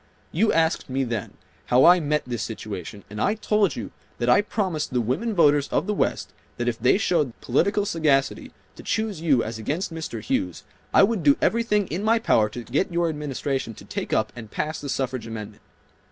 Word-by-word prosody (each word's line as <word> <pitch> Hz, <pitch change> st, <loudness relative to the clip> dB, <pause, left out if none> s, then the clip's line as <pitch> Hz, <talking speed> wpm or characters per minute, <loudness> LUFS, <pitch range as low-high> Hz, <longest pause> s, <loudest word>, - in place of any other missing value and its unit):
You 215 Hz, +7 st, +2 dB
asked 160 Hz, -2 st, +1 dB
me 135 Hz, +1 st, 0 dB
then 115 Hz, -4 st, -4 dB, 0.3 s
how 125 Hz, +1 st, +5 dB
I 180 Hz, +1 st, +8 dB
met 150 Hz, -1 st, 0 dB
this 120 Hz, -2 st, -4 dB
situation, 105 Hz, -4 st, -6 dB
and 105 Hz, +1 st, -6 dB
I 210 Hz, -, +2 dB
told 210 Hz, -5 st, +1 dB
you 110 Hz, -5 st, -6 dB, 0.3 s
that 120 Hz, 0 st, 0 dB
I 125 Hz, -, +6 dB
promised 190 Hz, -8 st, -2 dB
the 125 Hz, -, +2 dB
women 140 Hz, -, -1 dB
voters 145 Hz, -4 st, +4 dB
of -, -, 0 dB
the 210 Hz, -, -1 dB
West -, -, -1 dB, 0.2 s
that 120 Hz, -, -2 dB
if 115 Hz, -2 st, -1 dB
they 125 Hz, +9 st, +4 dB
showed 165 Hz, -9 st, +1 dB
the -, -, -18 dB
political 200 Hz, -, +2 dB
sagacity 155 Hz, -8 st, +1 dB, 0.3 s
to -, -, -9 dB
choose 220 Hz, -6 st, -2 dB
you 140 Hz, -8 st, +3 dB
as 110 Hz, 0 st, -5 dB
against 165 Hz, -, -3 dB
Mr. 160 Hz, -8 st, -5 dB
Hughes, 90 Hz, -4 st, -2 dB, 0.3 s
I -, -, +6 dB
would 210 Hz, -1 st, +2 dB
do 145 Hz, -2 st, +5 dB
everything 215 Hz, -3 st, +2 dB
in 175 Hz, +5 st, -3 dB
my 225 Hz, +2 st, +4 dB
power 110 Hz, -, +3 dB
to 120 Hz, +3 st, -7 dB
get 140 Hz, -, -1 dB
your 170 Hz, 0 st, +1 dB
Administration 140 Hz, -5 st, -3 dB
to -, -, -13 dB
take -, -, -5 dB
up 110 Hz, -1 st, +1 dB
and 115 Hz, -3 st, -9 dB
pass 155 Hz, +7 st, -3 dB
the 145 Hz, -, -6 dB
suffrage 130 Hz, -3 st, -2 dB
amendment. 110 Hz, -2 st, -7 dB
145 Hz, 205 wpm, -24 LUFS, 120-185 Hz, 0.3 s, I